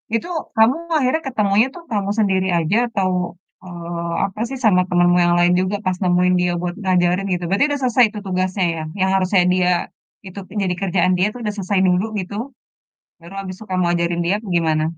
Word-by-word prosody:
itu 230 - -2 0.3
kamu 225 +4 +4 0.2
akhirnya 295 +3 +1
ketemunya 210 -1 +2
tuh 345 - -10
kamu 200 -2 -1
sendiri 190 -3 +1
aja 170 +7 +1
atau, 195 -5 -1 0.5
eee, 170 -1 -6 0.2
apa 195 +2 -8
sih, 270 - -5
sama 180 -4 +5
temenmu 175 0 +3
yang 175 0 +3
lain 175 0 +4
juga 185 +2 -1
pas 185 -1 0
nemuin 180 0 +3
dia 180 0 +1
buat 175 -1 -3
ngajarin 180 0 +1
gitu, 175 0 -3
berarti 200 +9 +3
udah 285 - -1
selesai 250 0 +4
itu 210 0 -8
tugasnya 185 0 0
ya? 160 - -5 0.2
Yang 190 0 +2
harusnya 185 -1 +2
dia 180 -1 +2 0.6
itu 190 +2 -8 0.2
jadi 180 -1 -1
kerjaan 185 -1 +1
dia 185 - +3
tuh 245 - -9
udah 210 - -1
selesai 195 0 0
dulu 180 +3 +2
gitu, 190 +2 -6 0.9
baru 170 +3 -13
habis 185 -1 -7
tuh 215 - -10
kamu 185 -1 +1
ajarin 170 0 0
dia, 180 +4 +1
apa 215 - -12
gimana? 155 -2 +1
185 Hz, 195 wpm, -20 LUFS, 175-205 Hz, 0.9 s, sama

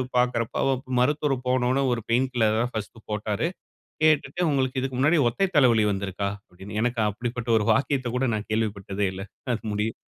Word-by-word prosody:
பாக்கறப்போ, 125 -2 +1
அவருக்கு 130 -1 -1
மருத்துவர் 145 +2 +2
போன 125 -1 +2
உடனே 135 +1 +2
ஒரு 120 - -2
பெயின் 125 +3 +2
கில்லர் 110 -2 +2
தான் 120 +1 -1
ஃபர்ஸ்ட் 110 +1 -5
போட்டாரு. 105 +6 -1 0.6
கேட்டுட்டு 155 +3 +2
"உங்களுக்கு 130 -2 0
இதுக்கு 130 -1 -3
முன்னாடி 150 +6 +4
ஒற்றை 195 +11 +1
தலைவலி 120 -6 +5
வந்திருக்கா?" 100 0 -2 0.2
அப்படின்னு, 95 +4 -9
எனக்கு 120 0 0
அப்படிப்பட்ட 120 +3 -4
ஒரு 105 - 0
வாக்கியத்த 130 -1 +1
கூட 130 +1 +1
நான் 105 0 -5
கேள்விப்பட்டதே 100 -2 -1
இல்ல. 95 - -6 0.3
அது 110 - -7
முடியும். 105 +2 -1
120 Hz, 170 wpm, -25 LUFS, 105-130 Hz, 0.6 s, தலைவலி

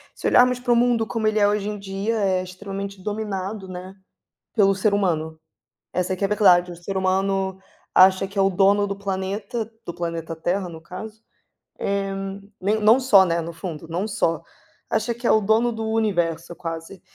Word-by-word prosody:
se - - -9
olharmos 250 0 +5
para 245 -1 +2
o - - +3
mundo 235 -1 +3
como 220 -1 -1
ele 215 0 +1
é 205 - +5
hoje 205 0 0
em 210 - -4
dia 195 +3 -2
é 190 -2 +1
extremamente 195 +1 -7
dominado, 205 -1 -4
né, 185 +1 -8 0.6
pelo 195 -3 +4
ser 200 +2 +1
humano, 160 -5 0 0.5
essa 180 +1 -1
é - - -1
que 185 - -9
é - - +5
a - - -8
verdade, 180 -4 +4
o - - -10
ser 175 +3 -6
humano 190 0 0 0.4
acha 190 +1 +6
que 195 +1 -8
é - - +5
o 195 - +4
dono 200 +2 +3
do 200 0 -4
planeta, 200 +4 -3 0.2
do - - -5
planeta 165 -1 -4
Terra 180 +3 -1
no 165 -2 -9
caso, 195 +6 -9 0.6
eh, 200 0 -1 0.5
nem 210 +3 +1
não 220 +4 +5
só, 205 -8 +6
né, 170 -1 0
no 165 +1 -5
fundo, 165 -2 -7
não 180 +5 -2
só, 165 -5 0 0.5
acha 225 +2 0
que 240 - -10
é - - +5
o 220 - +4
dono 220 +4 +2
do 225 -1 -4
universo 175 -6 0
quase. 165 +2 -7
195 Hz, 195 wpm, -23 LUFS, 180-215 Hz, 0.6 s, acha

